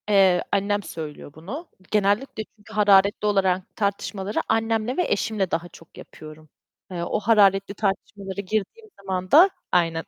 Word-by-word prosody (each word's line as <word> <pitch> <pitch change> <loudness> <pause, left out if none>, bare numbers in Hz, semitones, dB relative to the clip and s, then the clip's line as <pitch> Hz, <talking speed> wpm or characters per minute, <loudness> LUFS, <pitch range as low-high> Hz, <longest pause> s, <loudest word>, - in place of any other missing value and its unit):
Eee, 190 -3 +4
annem 205 +1 0
söylüyor 150 -4 -8
bunu. 225 - -8 0.2
Genellikle 210 +3 0
çünkü 215 +1 -16
hararetli 205 -1 +4
olarak 190 -2 0
tartışmaları, 200 0 -2
annemle 225 +2 0
ve 360 - +2
eşimle 205 -3 -1
daha 170 +1 -2
çok 165 -1 -17
yapıyorum. 155 0 -13 0.4
Eee, 175 -2 -4
o - - -1
hararetli 200 -3 +3
tartışmalara 200 -1 -3
girdiğim 215 - -4
zaman 185 -1 -4
da, 350 +6 +8 0.2
aynen, 165 -2 +1
200 Hz, 135 wpm, -24 LUFS, 185-215 Hz, 0.4 s, da